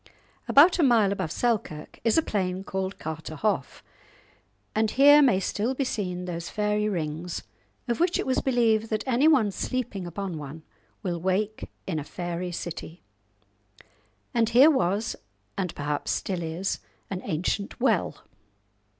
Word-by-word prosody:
About 335 Hz, +6 st, +6 dB
a -, -, +5 dB
mile 230 Hz, -7 st, +4 dB
above 185 Hz, -5 st, -2 dB
Selkirk 215 Hz, -11 st, -2 dB
is 230 Hz, +3 st, +3 dB
a 325 Hz, -, +4 dB
plain 185 Hz, -5 st, -2 dB
called 190 Hz, 0 st, -3 dB
Carterhaugh, 160 Hz, +5 st, -3 dB, 0.9 s
and 220 Hz, 0 st, +2 dB
here 290 Hz, +5 st, +7 dB
may 245 Hz, -9 st, +4 dB
still 220 Hz, +6 st, -1 dB
be 275 Hz, -, 0 dB
seen 180 Hz, -7 st, -3 dB
those 170 Hz, -1 st, -5 dB
fairy 210 Hz, 0 st, 0 dB
rings 165 Hz, -1 st, -3 dB, 0.4 s
of 235 Hz, -, -1 dB
which 350 Hz, +1 st, +2 dB
it -, -, -2 dB
was 260 Hz, -, +1 dB
believed 225 Hz, -4 st, +2 dB
that 215 Hz, -1 st, -1 dB
anyone 260 Hz, -3 st, +4 dB
sleeping 205 Hz, -5 st, -3 dB
upon 175 Hz, -1 st, -4 dB
one 150 Hz, +2 st, -8 dB, 0.4 s
will 175 Hz, -2 st, -2 dB
wake 200 Hz, +4 st, -1 dB, 0.2 s
in 165 Hz, -5 st, -2 dB
a -, -, -4 dB
fairy 175 Hz, +3 st, -4 dB
city. 170 Hz, 0 st, -6 dB, 1.3 s
And 230 Hz, -2 st, +2 dB
here 260 Hz, +7 st, +7 dB
was, 205 Hz, -, 0 dB, 0.4 s
and 185 Hz, -4 st, -3 dB
perhaps 145 Hz, 0 st, -3 dB
still 185 Hz, -3 st, -1 dB
is, 170 Hz, +4 st, -2 dB, 0.3 s
an 190 Hz, -1 st, -3 dB
ancient 185 Hz, +8 st, -2 dB
well. 265 Hz, -, +1 dB
200 Hz, 140 wpm, -26 LUFS, 175-235 Hz, 1.3 s, here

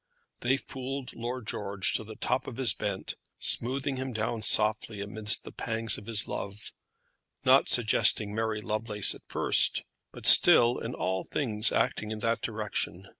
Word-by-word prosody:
They 130 Hz, +3 st, 0 dB
fooled 135 Hz, 0 st, -7 dB
Lord 120 Hz, +1 st, -6 dB
George 100 Hz, -2 st, -1 dB
to -, -, -2 dB
the 110 Hz, 0 st, -11 dB
top -, -, -2 dB
of 125 Hz, -, -8 dB
his 130 Hz, -6 st, +1 dB
bent, 100 Hz, -2 st, -5 dB, 0.2 s
smoothing 135 Hz, +3 st, 0 dB
him 130 Hz, 0 st, -5 dB
down 110 Hz, +1 st, -3 dB
softly 110 Hz, 0 st, 0 dB
amidst 105 Hz, +1 st, +1 dB
the -, -, -11 dB
pangs 115 Hz, 0 st, 0 dB
of 105 Hz, -, -16 dB
his 110 Hz, -3 st, -2 dB
love, 100 Hz, +1 st, -6 dB, 0.7 s
not -, -, +4 dB
suggesting 105 Hz, -1 st, +3 dB
Mary 110 Hz, -1 st, -3 dB
Lovelace 105 Hz, -1 st, 0 dB
at -, -, -12 dB
first, -, -, +3 dB, 0.3 s
but -, -, -12 dB
still 120 Hz, +1 st, +7 dB
in 115 Hz, -, -6 dB
all 95 Hz, 0 st, -3 dB
things 110 Hz, -5 st, 0 dB
acting 105 Hz, -, -1 dB
in 110 Hz, -, -5 dB
that 115 Hz, +2 st, -2 dB
direction. 105 Hz, -4 st, -5 dB
110 Hz, 160 wpm, -28 LUFS, 105-120 Hz, 0.7 s, still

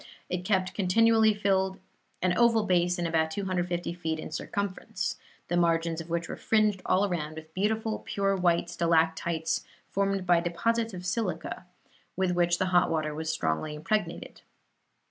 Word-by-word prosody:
It 180 Hz, 0 st, -2 dB
kept 185 Hz, -1 st, +1 dB
continually 220 Hz, +3 st, +4 dB
filled 190 Hz, -2 st, +1 dB, 0.5 s
an 185 Hz, -1 st, +2 dB
oval 230 Hz, -2 st, +4 dB
basin 180 Hz, -2 st, +1 dB
about 160 Hz, -1 st, +1 dB
250 175 Hz, -1 st, -2 dB
feet 160 Hz, -2 st, -3 dB
in 155 Hz, -, -7 dB
circumference 200 Hz, +4 st, -3 dB, 0.3 s
the 175 Hz, -, -1 dB
margins 165 Hz, -1 st, +1 dB
of 165 Hz, -, -11 dB
which 170 Hz, 0 st, -1 dB
were -, -, -5 dB
fringed 215 Hz, -3 st, +2 dB
all 195 Hz, +2 st, +3 dB
round 155 Hz, -4 st, -3 dB
with 160 Hz, 0 st, -10 dB
beautiful 220 Hz, +3 st, 0 dB
pure 195 Hz, -1 st, 0 dB
white 175 Hz, -2 st, +2 dB
stalactites, 165 Hz, -1 st, +1 dB, 0.3 s
formed 195 Hz, -1 st, 0 dB
by 175 Hz, -1 st, +5 dB
deposits 225 Hz, +6 st, -1 dB
of 180 Hz, 0 st, -7 dB
silica, 185 Hz, -3 st, -3 dB, 0.5 s
with 190 Hz, -1 st, +1 dB
which 175 Hz, -1 st, +2 dB
the 185 Hz, -, +1 dB
hot 175 Hz, -, +5 dB
water 155 Hz, -2 st, -1 dB
was 160 Hz, +1 st, -4 dB
strongly 120 Hz, -, -1 dB
impregnated. 170 Hz, +3 st, -3 dB
180 Hz, 150 wpm, -28 LUFS, 165-195 Hz, 0.5 s, by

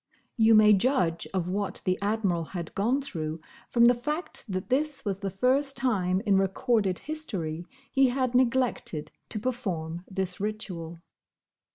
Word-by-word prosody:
You 225 Hz, -1 st, +5 dB
may 215 Hz, 0 st, +7 dB
judge 195 Hz, -6 st, +1 dB
of 185 Hz, -3 st, -1 dB
what 195 Hz, +2 st, -2 dB
the 185 Hz, -, +2 dB
Admiral 200 Hz, -5 st, 0 dB
had 170 Hz, -2 st, -5 dB
gone 240 Hz, +8 st, +1 dB
through 160 Hz, -, -4 dB, 0.3 s
from 235 Hz, -1 st, +5 dB
the 245 Hz, -, +7 dB
fact 300 Hz, +8 st, -4 dB
that 185 Hz, +3 st, -3 dB
this 290 Hz, +2 st, 0 dB
was 195 Hz, -2 st, -2 dB
the 200 Hz, -1 st, -2 dB
first 260 Hz, +8 st, +2 dB
time 195 Hz, -7 st, +1 dB
in 195 Hz, -2 st, +4 dB
recorded 195 Hz, 0 st, +1 dB
history 180 Hz, -, -4 dB, 0.2 s
he 270 Hz, -1 st, +4 dB
had 255 Hz, 0 st, 0 dB
neglected 250 Hz, -10 st, +1 dB, 0.2 s
to -, -, -3 dB
perform 180 Hz, -9 st, -3 dB
this 190 Hz, -2 st, -3 dB
ritual. 180 Hz, -6 st, -5 dB
205 Hz, 150 wpm, -28 LUFS, 180-250 Hz, 0.3 s, may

